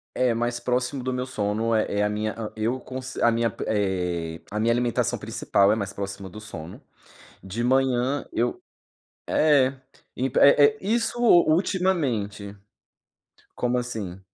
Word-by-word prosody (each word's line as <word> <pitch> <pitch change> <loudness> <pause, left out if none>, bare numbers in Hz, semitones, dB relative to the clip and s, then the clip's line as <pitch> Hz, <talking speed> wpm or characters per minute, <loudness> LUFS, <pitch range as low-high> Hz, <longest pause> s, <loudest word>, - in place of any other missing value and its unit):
É 125 -1 +2
mais 120 +1 -1
próximo 125 +2 -1
do 130 - -2
meu 125 0 -2
sono 110 -2 -1
é 110 -1 +2
é - - +3
a 105 - +1
minha 105 0 -2
hã, 110 -2 -5
eu 115 +4 -1
conce 130 +1 -7
a 120 - +5
minha, 115 0 +1
eh, 90 -5 -1
a 105 - -2
minha 115 +2 +2
alimentação 120 -1 0
principal 100 +1 +1
é - - +3
mais 100 -3 -3
próxima 100 -1 -6
do 105 - -10
sono. 85 -6 -9 0.6
De 95 +5 -4
manhã 130 +1 +1
eu 120 +1 -1 0.7
é 140 -4 +3 0.4
impe 130 +1 0
é 140 +1 +7
é 215 +9 +2
isso 230 +4 -1
ultimamente. 155 - +2 1.0
Como 125 0 0
assim? 110 -7 -4
120 Hz, 150 wpm, -25 LUFS, 105-130 Hz, 1.0 s, é